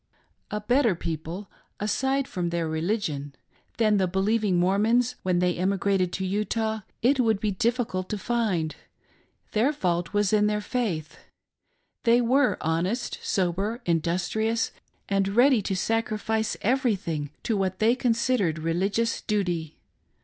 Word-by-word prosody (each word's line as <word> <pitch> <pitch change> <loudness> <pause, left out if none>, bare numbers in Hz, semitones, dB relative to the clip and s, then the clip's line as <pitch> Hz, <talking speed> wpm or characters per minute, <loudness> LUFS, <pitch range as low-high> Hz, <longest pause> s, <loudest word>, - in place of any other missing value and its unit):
A 210 - -2
better 235 -1 +2
people 165 +4 -5 0.2
— - - -44
raside 265 +6 0
from 175 -2 -2
their 170 -1 -1
religion 160 -4 -2 0.2
— - - -37
than 215 -2 +3
the 190 -1 +2
believing 195 +1 +1
Mormons 215 +7 +2
when 185 -1 +1
they 180 0 +2
emigrated 190 0 +1
to 190 - -2
Utah, 220 +3 -1 0.2
it 265 +3 +4
would 220 -5 +3
be 210 0 0
difficult 220 -3 -1
to 210 - -2
find. 195 -8 -1 0.8
Their 230 +7 +2
fault 175 - -1
was 205 -1 +1
in 210 0 +4
their 210 0 0
faith. 195 -9 -3 0.8
They 235 0 +5
were 255 +3 +3
honest, 180 +9 -1
sober, 195 +5 -1
industrious, 180 +7 0 0.4
and 195 -1 +1
ready 250 -1 +5
to 195 0 -2
sacrifice 220 +1 -1
everything 200 - 0
to 225 - 0
what 190 -2 -1
they 220 +3 +4
considered 235 -8 +1
religious 190 +8 0
duty. 175 -7 -2
205 Hz, 135 wpm, -26 LUFS, 180-230 Hz, 0.8 s, They